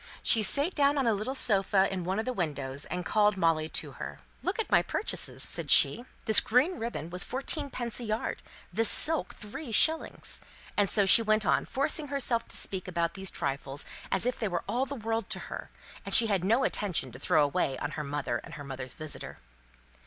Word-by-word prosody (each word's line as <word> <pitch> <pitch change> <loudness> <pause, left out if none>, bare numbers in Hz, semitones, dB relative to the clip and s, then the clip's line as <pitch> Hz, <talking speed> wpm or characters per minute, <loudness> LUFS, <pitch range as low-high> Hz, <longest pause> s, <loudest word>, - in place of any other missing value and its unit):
She 225 - +5
sate 285 - +1
down 285 0 +2
on 270 - +1
a 230 - +3
little 215 +6 -3
sofa 195 -5 +3
in 185 -2 -4
one 190 +2 -2
of 220 - -2
the 255 - -2
windows, 145 - -3
and 180 0 -5
called 210 -1 +2
Molly 160 -3 +1
to - - -3
her. - - -8 0.2
"Look - - -2
at 450 - -3
my - - +5
purchases," - - -2
said - - -6
she. 240 - +5 0.2
"This 220 - +8
green 275 +11 +1
ribbon 225 -8 -5
was 180 0 +4
fourteen 280 +3 -3
pence 240 -3 -5
a - - -6
yard, 215 0 -3 0.3
this 225 -1 +3
silk 320 0 +2
three 230 +5 -8
shillings," 320 +8 +1 0.3
and 205 -2 +2
so 205 -2 +2
she 195 +4 +8
went 215 -1 +1
on, - - +1
forcing 280 +2 -1
herself 265 -4 0
to - - 0
speak 190 -1 +1
about 170 -2 -2
these 190 -1 -2
trifles 135 +1 -3 0.3
as - - +2
if 250 - -1
they 220 - -1
were 175 -3 -3
all 260 +3 -1
the 280 - -6
world 225 -2 -3
to - - 0
her, - - -8 0.3
and - - +3
she 235 - +9
had 200 -5 0
no 230 +7 +2
attention 180 - -1
to 125 - -12
throw 155 0 +2
away 140 -2 -1
on 145 - -4
her 150 0 -5
mother 140 -4 -3
and - - -11
her 145 - -8
mother's 130 -2 -6
visitor. 155 -2 -7
210 Hz, 210 wpm, -29 LUFS, 170-250 Hz, 0.3 s, she